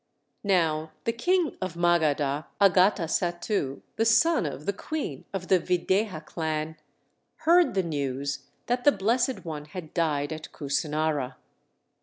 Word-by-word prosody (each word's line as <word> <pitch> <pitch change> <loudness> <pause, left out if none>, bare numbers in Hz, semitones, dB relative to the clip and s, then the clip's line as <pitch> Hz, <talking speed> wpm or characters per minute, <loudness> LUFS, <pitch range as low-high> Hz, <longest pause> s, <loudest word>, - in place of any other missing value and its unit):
Now 160 -5 +1
the 230 - 0
king 350 +5 +1
of 185 -2 -3
Magadha, 155 -4 +1
Agatasattu, 180 -4 +2
the 225 - +2
son 230 - +4
of 145 +1 -7
the 200 - 0
queen 200 - -5
of 190 -2 -4
the 185 - +5
Videha 180 -1 0
clan, 160 -1 -3 0.7
heard 345 - +5
the 190 - +2
news 140 -3 -3 0.2
that 245 +1 0
the 290 - +7
Blessed 240 +3 0
One 150 -3 -5
had 160 0 -9
died 150 -3 0
at 155 0 -8
Kusinara. 150 -2 -1
170 Hz, 130 wpm, -27 LUFS, 150-205 Hz, 0.7 s, the